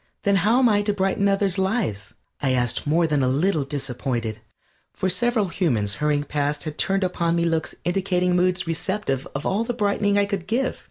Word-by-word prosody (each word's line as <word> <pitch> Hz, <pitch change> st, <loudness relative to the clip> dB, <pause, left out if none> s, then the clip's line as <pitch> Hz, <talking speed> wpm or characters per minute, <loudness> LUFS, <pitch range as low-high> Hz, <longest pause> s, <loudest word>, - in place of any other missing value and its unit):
"Then 200 Hz, -1 st, +3 dB
how 210 Hz, +6 st, +3 dB
am 260 Hz, -1 st, +5 dB
I 205 Hz, -2 st, +3 dB
to 205 Hz, 0 st, 0 dB
brighten 195 Hz, 0 st, +1 dB
others' 195 Hz, -1 st, +1 dB
lives?" 190 Hz, -, -1 dB, 0.3 s
I 135 Hz, -2 st, +1 dB
asked, 125 Hz, +2 st, -1 dB
more 165 Hz, +3 st, +3 dB
than 150 Hz, -3 st, +1 dB
a 130 Hz, -, +2 dB
little 150 Hz, +4 st, +1 dB
disappointed, 125 Hz, -5 st, -3 dB, 0.6 s
for 190 Hz, -, 0 dB
several 215 Hz, +1 st, +1 dB
humans 120 Hz, -, 0 dB
hurrying 150 Hz, -1 st, +1 dB
past 145 Hz, 0 st, -2 dB
had 155 Hz, -1 st, -6 dB
turned 195 Hz, 0 st, +1 dB
upon 170 Hz, -2 st, 0 dB
me 170 Hz, 0 st, +1 dB
looks 165 Hz, -1 st, -1 dB
indicating 180 Hz, 0 st, +1 dB
moods 180 Hz, 0 st, +1 dB
receptive 165 Hz, -4 st, -2 dB
of 135 Hz, -, -4 dB
all 205 Hz, +4 st, +1 dB
the 240 Hz, +1 st, -3 dB
brightening 205 Hz, 0 st, +1 dB
I 200 Hz, -, +3 dB
could 200 Hz, -3 st, -4 dB
give. 255 Hz, +5 st, -1 dB
180 Hz, 195 wpm, -23 LUFS, 145-200 Hz, 0.6 s, am